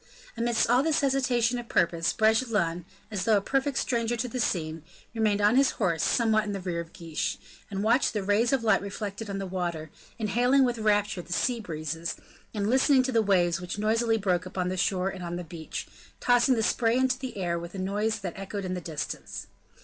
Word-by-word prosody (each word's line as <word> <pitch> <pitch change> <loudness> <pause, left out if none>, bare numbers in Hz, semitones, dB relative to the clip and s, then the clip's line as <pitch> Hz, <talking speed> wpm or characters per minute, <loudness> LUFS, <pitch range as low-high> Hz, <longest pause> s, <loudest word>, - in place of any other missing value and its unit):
Amidst 235 -1 +1
all 245 +2 +4
this 315 +1 +1
hesitation 255 -3 +1
of 235 - -9
purpose, 170 -1 +2
Bragelonne, 215 -7 +1 0.3
as 195 -4 -2
though 220 -2 +5
a - - +3
perfect 270 +6 -1
stranger 235 -1 0
to 235 - -2
the 250 +1 -4
scene, 160 -7 -1 0.3
remained 215 -3 +1
on 210 +4 +4
his 275 0 +5
horse 170 -7 +1
somewhat 220 -3 +2
in 205 -1 -4
the 195 - -3
rear 180 -2 -3
of 170 0 -7
Guiche, 165 -3 -3 0.3
and 195 0 -3
watched 235 +3 +3
the 210 -3 -1
rays 205 +4 +2
of 270 -4 +1
light 215 -3 +3
reflected 200 +1 -5
on 200 - -3
the 195 - -3
water, 175 -4 -3 0.3
inhaling 245 +5 +3
with 245 -2 0
rapture 205 -3 +1
the 175 - -14
sea 240 +5 +1
breezes, 160 -3 -4 0.4
and 205 -2 -2
listening 260 +2 +4
to 260 - -1
the 230 -2 +3
waves 175 -4 +2
which 180 +3 -5
noisily 225 +2 +2
broke 185 -4 0
upon 180 -1 -2
the 185 - -2
shore 185 0 +1
and 190 -2 -7
on 170 0 -4
the 175 - -4
beach, 165 -1 -6 0.3
tossing 245 +1 +4
the 225 - 0
spray 230 +1 +2
into 260 0 +1
the 260 -5 -6
air 175 -3 -1
with 170 +2 -8
a - - -5
noise 205 +3 -1
that 180 -3 -4
echoed 195 0 -5
in 185 - -2
the 180 - -4
distance. 160 -3 -5
205 Hz, 210 wpm, -27 LUFS, 180-235 Hz, 0.4 s, though